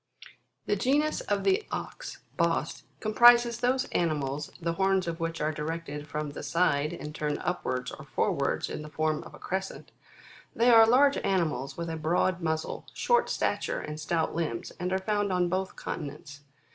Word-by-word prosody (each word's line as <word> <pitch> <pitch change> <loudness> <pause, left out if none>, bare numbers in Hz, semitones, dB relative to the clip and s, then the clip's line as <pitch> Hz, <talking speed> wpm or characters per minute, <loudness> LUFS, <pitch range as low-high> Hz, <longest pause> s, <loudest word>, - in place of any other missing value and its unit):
The 205 - +1
genus 285 +8 +1
of 205 -1 +1
the 390 +3 +2
Ox, - - -6
Bos, - - 0 0.2
comprises 235 +2 +6
those 255 +1 +1
animals, 150 -3 -1
the 170 -1 -1
horns 190 0 +1
of 165 0 -3
which 165 0 -3
are 150 +1 0
directed 150 -1 -5
from 150 0 -3
the - - -7
side, 150 -4 +1
and 150 -3 -7
turn 150 -1 -2
upwards 130 -8 -2
or - - -9
forwards - - 0
in - - -5
the 150 - -8
form 155 0 0
of - - -12
a - - -12
crescent; 190 +1 -5 0.6
they 240 +2 +5
are 225 -1 +8
large 275 +4 +5
animals 150 -8 -1
with 170 0 -3
a 165 -1 -3
broad 170 +3 +1
muzzle, 160 -1 -2
short 480 0 +2
stature, - - -1
and 150 0 -6
stout 160 +1 -1
limbs, 155 -8 -3
and 180 +1 -2
are 190 - +2
found 205 +1 0
on 180 -1 +1
both 190 +2 -2
continents. 145 -1 -7
170 Hz, 170 wpm, -28 LUFS, 150-205 Hz, 0.6 s, are